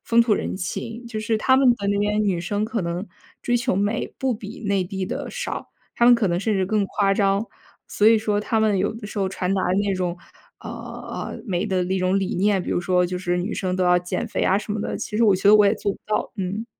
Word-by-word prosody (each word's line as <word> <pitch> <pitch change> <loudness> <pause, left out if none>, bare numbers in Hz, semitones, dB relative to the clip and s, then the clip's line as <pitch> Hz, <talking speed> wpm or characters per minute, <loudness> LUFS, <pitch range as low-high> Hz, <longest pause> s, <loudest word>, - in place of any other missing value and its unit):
风 235 0 +4
土 230 - +1
人 - - -3
情。 225 +6 -5
就 220 -2 -4
是 220 0 0
他 260 +4 +3
们 265 -1 +5
的 205 -4 -1
那 200 0 +1
边 210 +1 +1
女 185 -4 0
生 205 +4 -1
可 225 0 -2
能 175 +3 -3 0.4
追 245 - 0
求 235 -5 0
美 205 +4 0
不 265 -1 0
比 210 -2 -8
内 200 -2 +1
地 190 +1 -4
的 - - -5
少， - - -5 0.3
她 235 - +3
们 245 - +8
可 230 -3 +1
能 175 0 0
甚 215 +1 0
至 190 -1 +1
更 205 +1 0
夸 195 -1 +1
张。 195 +1 +2 0.4
所 210 - +1
以 225 - +6
说 210 -1 0
她 220 +2 0
们 215 -3 +2
有 195 +3 0
的 225 -2 -8
时 210 - -6
候 195 -1 +1
传 185 0 -2
达 195 - +1 0.3
那 200 - +1
种， 180 -2 -2 0.4
呃 - - -7
呃， - - -7
美 180 -3 -1
的 185 -2 0
那 190 +1 -1
种 185 +2 +2
理 190 -1 -2
念， 195 0 +2
比 - - -5
如 - - +1
说 180 0 +2
就 180 +1 -3
是 180 -1 -1
女 185 +5 -2
生 185 -1 -2
都 185 - +1
要 180 0 +5
减 175 0 -3
肥 - - -2
啊 190 - +3
什 205 +1 -3
么 215 - -2
的， - - -3
其 - - -6
实 230 +2 +3
我 200 -3 +5
觉 195 - -2
得 210 - +8
我 210 -1 +6
也 200 - +3
做 200 -1 -2
不 - - -13
到， 215 - -1
嗯。 195 +4 -3
200 Hz, 285 characters per minute, -23 LUFS, 185-215 Hz, 0.4 s, 们